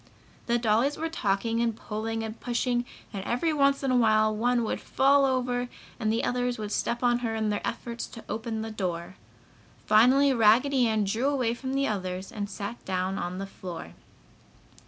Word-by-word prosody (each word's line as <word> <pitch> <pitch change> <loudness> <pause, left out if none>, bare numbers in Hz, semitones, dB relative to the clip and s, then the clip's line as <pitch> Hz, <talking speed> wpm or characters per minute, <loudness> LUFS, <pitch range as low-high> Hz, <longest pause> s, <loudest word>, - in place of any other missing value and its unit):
The 235 0 +3
dollies 235 +5 +2
were 325 +1 -2
talking 225 -3 0
and 230 -2 0
pulling 225 +1 -4
and 220 0 -6
pushing 245 0 0 0.3
and 195 -2 -4
every 280 +10 0
once 275 -1 +2
in 270 - +1
a - - +3
while 215 -2 +4
one 240 +2 +1
would 220 - -2
fall 275 +1 +4
over 250 -2 0 0.3
and 220 -2 +1
the 225 - 0
others 245 0 0
would 210 -1 -5
step 240 +3 -1
on 240 0 +3
her 230 -2 -2
in 220 -1 0
their 205 - -1
efforts 235 0 -4
to 225 - -11
open 220 0 -3
the 225 - -5
door. 180 -3 -4 0.7
Finally 260 +6 +5
Raggedy 245 +3 +4
Ann 220 -1 +1
drew 220 +7 0
away 255 -5 +1
from 260 +2 -4
the 275 0 +2
others 185 -2 -3
and 205 -3 -4
sat 205 +3 -6
down 185 +1 -2
on 175 +1 -3
the 195 - -4
floor. 180 -3 -8
230 Hz, 185 wpm, -27 LUFS, 210-250 Hz, 0.7 s, Finally